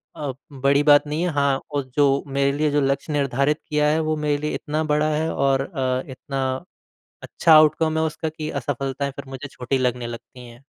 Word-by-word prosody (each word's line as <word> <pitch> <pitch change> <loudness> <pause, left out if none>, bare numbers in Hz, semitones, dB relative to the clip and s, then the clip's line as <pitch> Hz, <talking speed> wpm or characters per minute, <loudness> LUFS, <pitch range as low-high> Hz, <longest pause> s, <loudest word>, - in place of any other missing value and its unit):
अ, 145 -3 -4 0.2
बड़ी 140 +1 +2
बात 145 0 +5
नहीं 150 +2 -2
है 180 - +1
हाँ, 140 -1 +1
और 145 -1 -1
जो 140 -1 +3
मेरे 140 0 +1
लिए 150 0 +1
जो 145 0 +2
लक्ष्य 140 +3 -1
निर्धारित 140 +1 +1
किया 150 -1 +2
है 155 +1 +2
वो 155 - +1
मेरे 145 -1 +2
लिए 150 +1 -3
इतना 155 +1 -2
बड़ा 150 +1 +2
है 160 +2 -1
और 135 -1 +2
अ, 130 -4 -2
इतना 135 +1 -4 0.8
अच्छा 165 - +3
आउटकम 155 +1 +5
है 160 - +2
उसका 160 0 -3
कि 155 0 -6
असफ़लताएँ 140 +1 -3
फिर 140 - -8
मुझे 135 +2 -7
छोटी 130 0 -2
लगने 125 -2 -1
लगती 120 +1 -10
हैं। 120 +2 -15
140 Hz, 200 wpm, -22 LUFS, 135-150 Hz, 0.8 s, बात